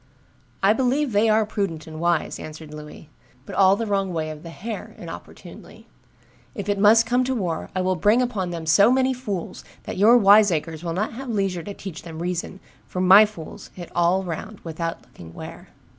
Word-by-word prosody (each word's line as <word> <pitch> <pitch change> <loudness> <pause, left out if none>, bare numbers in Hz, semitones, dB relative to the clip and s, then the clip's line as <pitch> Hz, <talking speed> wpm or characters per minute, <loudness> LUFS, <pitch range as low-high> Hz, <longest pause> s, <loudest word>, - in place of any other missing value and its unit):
"I 200 +2 +5
believe 260 +3 0
they 210 +2 +3
are 215 0 +3
prudent 195 -7 -3
and 155 -1 -9
wise," 170 -1 0
answered 155 0 -9
Louis, 150 0 -11 0.3
"but - - -9
all 195 0 +5
the 230 +2 -3
wrong 195 -2 -1
way 160 -2 -3
of 155 -1 -9
the 170 - -9
hair 215 +6 -7
(inopportunely); - - -11 0.7
if 200 -4 -5
it 205 -1 0
must 220 +3 +6
come 245 +2 +1
to 260 +1 -1
war, 175 -8 -3
I 185 - 0
will 185 0 +1
bring 210 +7 +3
upon 220 -8 -1
them 170 -2 -5
so 185 +7 +5
many 260 0 +2
fools, 210 -9 -5 0.2
that - - -6
your 225 +4 +7
wiseacres 195 -7 +4
will 170 -1 -3
not 210 +7 -2
have 260 +2 -7
leisure 195 -5 -1
to 200 +4 -8
teach 190 -4 -8
them 165 -2 -9
reason, 180 +2 -4 0.3
for 180 - -5
my 190 +4 +7
fools 185 -7 -11
hit 175 -2 -9
all 175 +2 +2
round 190 +4 -6
without 165 0 -5
looking 80 -1 -14
where." - - -10
190 Hz, 195 wpm, -23 LUFS, 165-215 Hz, 0.7 s, your